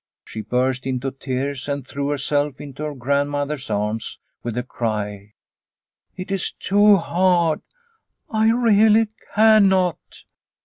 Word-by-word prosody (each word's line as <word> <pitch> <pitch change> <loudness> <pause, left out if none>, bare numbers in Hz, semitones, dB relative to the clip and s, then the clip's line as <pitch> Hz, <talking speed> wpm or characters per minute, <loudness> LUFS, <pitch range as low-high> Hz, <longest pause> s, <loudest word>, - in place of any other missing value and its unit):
She 110 - -7
burst 125 +4 -1
into 130 +1 -2
tears 135 +1 -4
and 140 -2 -3
threw 140 +1 -4
herself 145 0 -1
into 145 0 -9
her 150 -1 -4
grandmother's 140 +1 -1
arms 105 +1 -2 0.2
with 120 -2 -4
the 125 - -2
cry, 105 -4 -4 0.8
"It 185 +1 -6
is 195 -2 -1
too 205 +1 +4
hard, 170 -2 +1 0.7
I 220 0 +2
really 220 -2 +4 0.3
cannot." 195 -5 +4
145 Hz, 120 wpm, -21 LUFS, 125-185 Hz, 0.8 s, too